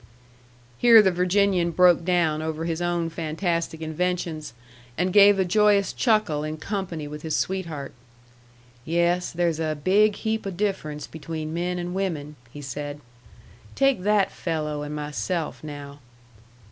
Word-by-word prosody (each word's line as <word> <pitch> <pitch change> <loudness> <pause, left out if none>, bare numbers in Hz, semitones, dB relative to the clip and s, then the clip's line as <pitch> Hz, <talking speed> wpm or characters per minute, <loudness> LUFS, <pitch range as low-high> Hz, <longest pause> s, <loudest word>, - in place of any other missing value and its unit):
Here 235 -2 +8
the 190 - +3
Virginian 180 0 +2
broke 175 0 +4
down 165 -3 +1
over 160 0 -3
his 165 0 -2
own 175 -1 -1
fantastic 165 0 -2
inventions, 160 -3 -3 0.4
and 180 +2 0
gave 205 -1 +7
a 190 - +2
joyous 205 +1 +3
chuckle 215 - +1
in 155 +1 -4
company 175 -4 -4
with 150 +1 -8
his 160 -1 -2
sweetheart. 165 -7 -3 0.9
"Yes, 170 +3 +1
there's 170 -2 0
a 155 -1 -1
big 205 +2 +4
heap 220 -1 -2
o' - - -1
difference 180 -6 -3
between 160 -1 -6
men 175 +1 -2
and 175 0 -4
women," 160 -6 -3 0.2
he 145 +2 -9
said. 145 +2 -5 0.8
"Take 275 -7 +2
that 205 0 +2
fello' 150 -3 -3
and 150 0 -5
myself, 150 - -3
now." 145 -1 -8
170 Hz, 140 wpm, -24 LUFS, 155-190 Hz, 0.9 s, Here